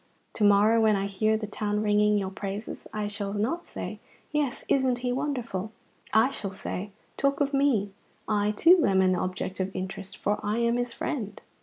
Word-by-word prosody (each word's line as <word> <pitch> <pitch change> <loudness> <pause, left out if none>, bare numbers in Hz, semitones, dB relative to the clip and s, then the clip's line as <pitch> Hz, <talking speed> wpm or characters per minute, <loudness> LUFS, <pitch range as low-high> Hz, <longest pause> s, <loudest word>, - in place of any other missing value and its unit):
To 215 - -2
morrow, 205 +3 +5
when 215 -1 +4
I 195 0 0
hear 215 +2 +1
the 215 - -4
town 210 0 -2
ringing 210 0 +3
your 190 -2 -2
praises, 200 +2 -6
I 215 -1 -2
shall 205 -1 -4
not 240 +12 -1
say, - - -6 0.3
'Yes, 295 -4 -1
isn't 260 -2 +2
he 245 - +1
wonderful?' 245 -7 -2 0.4
I 220 +5 +4
shall 195 -7 -5
say, 190 +1 -5 0.3
'Talk 275 0 +1
of 285 -1 +1
me; 260 -8 +2 0.4
I, 210 -1 +1
too, 330 - +5
am 190 -1 +4
an 185 0 +3
object 185 +1 -3
of 190 0 0
interest, 190 +1 -5
for 205 +1 0
I 210 +2 0
am 235 0 +2
his 245 -1 -1
friend.'" 220 -5 -4
210 Hz, 185 wpm, -27 LUFS, 200-245 Hz, 0.4 s, morrow